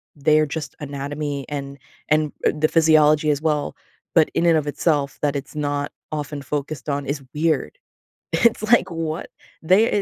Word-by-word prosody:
their 155 +1 +3
just 150 0 -5
anatomy 145 0 -4
and 140 -1 -5 0.3
and, 155 -1 +2
eh, - - +5
the 155 +1 +3
physiology 155 -2 +4
as 145 0 -1
well, 150 -2 0 0.4
but 160 -2 +5
in 170 - +1
and 165 -2 +5
of 150 -1 -2
itself 145 -2 0
that 145 -1 0
it's 140 +2 -6
not 145 -1 -2 0.2
often 150 -1 -4
focused 145 +1 -4
on 140 0 -1
is 140 0 -3
weird. 160 - 0 0.6
It's 235 -1 +3
like, 215 -3 +4
"What?" 165 -1 -4 0.3
They, 190 +8 +5
150 Hz, 160 wpm, -22 LUFS, 145-160 Hz, 0.6 s, eh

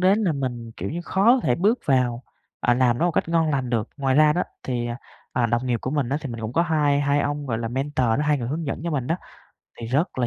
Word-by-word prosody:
đến 190 +3 +4
là 175 - +2
mình, 120 -5 -4
kiểu - - -4
như, 170 +4 -3
khó 190 +3 0
có 260 - +1
thể 125 - +2
bước 210 - +2
vào, 125 -3 +1 0.4
à, 120 - +3
làm 125 -1 +2
nó - - +1
một 175 - 0
cách - - 0
ngon 165 -1 +2
lành 135 -4 -1
được. 115 -3 0
Ngoài 135 -2 +1
ra 150 +1 +6
đó, 175 +3 +1 0.2
thì, 120 -2 -2
à, 120 0 -4 0.4
à, 120 -1 +2
đồng 120 +2 0
nghiệp 120 -2 0
của 130 - -3
mình 140 -4 0
á, 140 - 0
thì 145 - -5
mình 115 - -6
cũng 110 0 -4
có 170 - +3
hai 150 -4 +2
hai 145 0 +2
ông, 145 0 -2
gọi 115 -4 -1
là, 115 -1 -3
mentor 135 +1 -1
đó, 115 +3 +2
2 150 -1 +2
người 120 -2 -3
hướng 155 +4 -3
dẫn 140 - -3
cho 170 - -1
mình 135 -5 -1
đó, 165 - 0 0.6
thì 115 - -5
rất 135 - 0
là 120 - +2
135 Hz, 290 wpm, -24 LUFS, 120-155 Hz, 0.6 s, ra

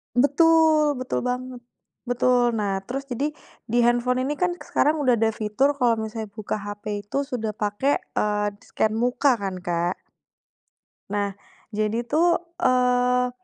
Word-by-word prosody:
Betul 305 +2 +4
betul 255 0 -2
banget, 250 0 -3 0.5
betul, 245 -1 +2
nah 200 -3 -1
terus 270 +2 -3
jadi 290 +5 -2 0.3
di 235 - 0
handphone 240 +2 +2
ini 290 +3 -3
kan 360 -1 +1
sekarang 300 +1 +2
udah 245 -3 +3
ada 225 - +3
fitur 240 +7 +1
kalau 240 -4 +2
misalnya 220 -1 -5
buka 215 0 -4
hp 205 0 -7 0.2
itu 205 - -4
sudah 225 -5 -3
pakai, 210 +6 0 0.2
eee, 210 0 +1 0.2
scan 215 0 -1
muka 245 +3 +2
kan 195 -4 -4
Kak. 175 0 -1 1.2
Nah, 200 -1 -1 0.4
jadi 215 +1 -1
tuh, 330 +8 +2 0.2
eee, 250 -2 +3
245 Hz, 140 wpm, -24 LUFS, 215-270 Hz, 1.2 s, Betul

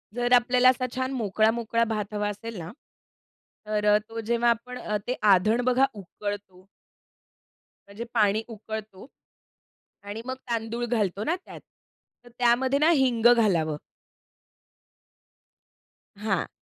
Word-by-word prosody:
जर 245 0 +1
आपल्याला 250 +1 +5
असा 255 0 +1
छान 260 +1 -2
मोकळा-मोकळा 225 0 +1
भात 210 -1 -4
हवा 205 0 -1
असेल 220 +1 -7
ना, 165 +1 -7 0.9
तर 210 0 -1
अ, - - +6
तो 225 0 -6
जेव्हा 235 +2 +1
आपण 250 +2 -2 0.3
ते 250 - 0 0.2
आधण 215 +6 +2
बघा 255 +2 +4
उकळतो 200 -1 -7 1.2
म्हणजे 205 +4 -7
पाणी 215 -1 +3
उकळतो 220 -1 -8 1.0
आणि 205 +3 -7
मग 260 - -3 0.2
तांदूळ 230 +1 -2
घालतो 210 -3 -1
ना 340 +3 0
त्यात, - - -11 0.6
तर - - -14
त्यामध्ये 250 +3 +3
ना 310 +3 +4
हिंग 255 -7 +2
घालावं. 170 -9 +1 2.4
हां. 200 -4 -1
225 Hz, 120 wpm, -26 LUFS, 205-245 Hz, 2.4 s, अ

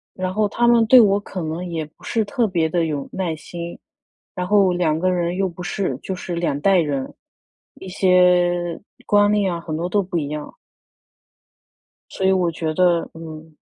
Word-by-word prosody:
然 185 0 -3
后 210 +1 +1
他 240 +4 +1
们 235 -1 +5
对 255 +3 +8
我 200 -2 +4
可 190 -2 -6
能 165 +3 -4
也 165 -2 -3
不 150 - -19
是 225 -2 0
特 235 +2 0
别 170 -5 0
地 170 0 0
有 145 -3 -4
耐 175 -4 -2
心， 170 +2 -8 0.6
然 180 0 -3
后 200 -2 +4
两 170 -3 +1
个 185 +2 +1
人 175 -1 -1
又 195 0 0
不 175 0 -12
是， 175 -7 -2
就 190 - -4
是 180 -1 -5
2 160 -5 -1
代 195 +2 +4
人， 140 -5 -1 0.6
一 190 - -11
些 180 -2 +2 0.3
观 205 0 +4
念 200 -3 +1
啊， 170 - -4
很 160 -2 -5
多 170 +2 -2
都 205 +2 +1
不 180 -1 -5
一 145 -4 -1
样。 150 0 -6 1.6
所 190 - -2
以 190 - +4
我 180 -2 +1
觉 160 -1 -3
得 175 -1 +2
嗯。 160 -1 -10
175 Hz, 200 characters per minute, -21 LUFS, 160-190 Hz, 1.6 s, 对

